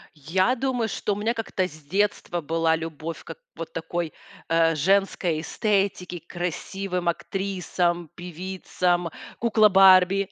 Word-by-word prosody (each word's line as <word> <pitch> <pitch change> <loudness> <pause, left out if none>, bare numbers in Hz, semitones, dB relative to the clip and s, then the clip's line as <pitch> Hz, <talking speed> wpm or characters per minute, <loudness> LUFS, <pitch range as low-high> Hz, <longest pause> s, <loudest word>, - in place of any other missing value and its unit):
Я 185 - +1
думаю, 245 -3 -1
что 205 -1 -2
у - - -9
меня 215 +3 0
как-то 225 -5 -2
с 155 -3 -12
детства 195 0 0
была 165 +1 +1
любовь 160 0 -6
как - - -9 0.2
вот - - -7
такой, 170 - -3 0.4
э, 165 0 +3
женской 180 -1 +1
эстетике, 195 -3 -1
к - - -37
красивым 180 +1 -3
актрисам, 175 -2 -1
певицам, 180 0 -2 0.3
кукла 220 -2 +4
Барби. 190 0 +6
180 Hz, 130 wpm, -25 LUFS, 165-195 Hz, 0.4 s, Барби